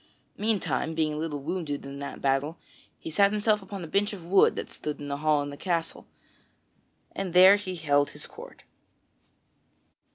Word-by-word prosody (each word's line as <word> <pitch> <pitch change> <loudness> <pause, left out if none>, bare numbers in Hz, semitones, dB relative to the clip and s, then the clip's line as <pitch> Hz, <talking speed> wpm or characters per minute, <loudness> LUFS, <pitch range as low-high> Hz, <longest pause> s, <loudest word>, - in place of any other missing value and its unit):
Meantime, 205 -7 -1
being 155 -1 +1
a - - -4
little 155 -1 -3
wounded 155 -4 -3
in 140 0 -7
that 140 0 -7
battle, 140 +4 +1 0.4
he 160 - -8
sat 200 +4 +4
himself 210 0 +2
down 195 - -15
upon 195 -2 -6
a - - -6
bench 205 +5 0
of 180 -5 -9
wood 190 +3 +4
that - - -4
stood 150 -1 -6
in 145 - -6
the 140 - -2
hall 150 -1 +2
of 145 - -5
the - - -7
castle, 165 0 -3 1.0
and 185 -3 -5
there 185 +2 +9
he 190 -3 -5
held 145 -3 +2
his - - -8
court. - - -12
165 Hz, 185 wpm, -27 LUFS, 145-195 Hz, 1.0 s, there